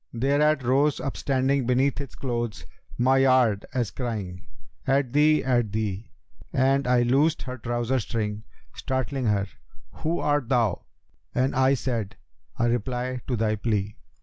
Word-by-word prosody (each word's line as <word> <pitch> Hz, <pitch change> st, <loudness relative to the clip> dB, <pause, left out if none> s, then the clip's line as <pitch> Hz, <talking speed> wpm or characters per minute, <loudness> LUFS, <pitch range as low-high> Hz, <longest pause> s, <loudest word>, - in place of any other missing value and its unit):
Thereat 140 Hz, +4 st, +2 dB
rose 135 Hz, +4 st, +2 dB
upstanding 135 Hz, -1 st, 0 dB
beneath 130 Hz, +3 st, +2 dB
its 140 Hz, -, -9 dB
clothes 120 Hz, -4 st, -3 dB, 0.2 s
* -, -, -19 dB
My 135 Hz, 0 st, +5 dB
yard, 130 Hz, -6 st, +3 dB
as 120 Hz, -5 st, -1 dB
crying, 100 Hz, -8 st, -5 dB, 0.4 s
'At 135 Hz, -2 st, +1 dB
thee! 150 Hz, +1 st, +4 dB
at 120 Hz, -5 st, +1 dB
thee!' 105 Hz, -1 st, -3 dB, 0.4 s
And 135 Hz, 0 st, +2 dB
I 125 Hz, -1 st, +4 dB
loosed 145 Hz, +7 st, +2 dB
her 130 Hz, -1 st, -6 dB
trouser 120 Hz, +3 st, -1 dB
string, 105 Hz, -1 st, -3 dB, 0.3 s
startling 130 Hz, 0 st, -2 dB
her: 100 Hz, -2 st, +2 dB, 0.3 s
* -, -, -28 dB
'Who 165 Hz, +2 st, -1 dB
art 145 Hz, -4 st, 0 dB
thou?' 115 Hz, -7 st, +1 dB, 0.5 s
and 130 Hz, +2 st, +1 dB
I 130 Hz, +1 st, +4 dB
said, 115 Hz, -6 st, -3 dB, 0.4 s
'A 120 Hz, -, +2 dB
reply 125 Hz, +1 st, -2 dB
to 125 Hz, -, 0 dB
thy 110 Hz, -1 st, +1 dB
plea!' 105 Hz, -2 st, -2 dB
125 Hz, 150 wpm, -25 LUFS, 115-135 Hz, 0.5 s, My